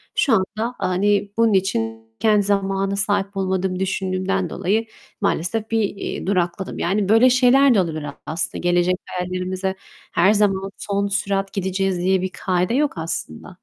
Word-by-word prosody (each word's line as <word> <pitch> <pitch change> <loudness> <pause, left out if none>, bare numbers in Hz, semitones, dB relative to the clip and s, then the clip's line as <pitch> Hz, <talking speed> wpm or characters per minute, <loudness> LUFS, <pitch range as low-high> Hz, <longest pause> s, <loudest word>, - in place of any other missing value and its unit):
şu 265 - +3
anda, 220 +5 -1
hani, 200 +2 +1
bunun 230 -2 +4
için 110 -12 -1
kendi 210 -2 +3
zamana 195 -1 0
sahip 200 0 0
olmadığımı 190 -1 -1
düşündüğümden 190 -1 -1
dolayı 215 +5 0 0.4
maalesef 220 +7 -1
bir, 225 - +2
eee, 195 -2 -4
durakladım. 185 -1 -1
Yani, 195 +2 0
böyle 225 +4 +6
şeyler 255 +2 +5
de 195 - +5
olabilir 155 -3 -3 0.2
aslında. 165 +2 -2
Gelecek 175 +1 +2
hayallerimize 185 +1 -3 0.4
her 190 +5 +4
zaman 195 -2 +1
son 200 0 -1
sürat 195 -1 -1
gideceğiz 190 -1 -1
diye 185 +1 +2
bir 185 - -2
kaide 180 +2 0
yok 290 +2 +1
aslında 160 - -5
195 Hz, 145 wpm, -21 LUFS, 185-205 Hz, 0.4 s, böyle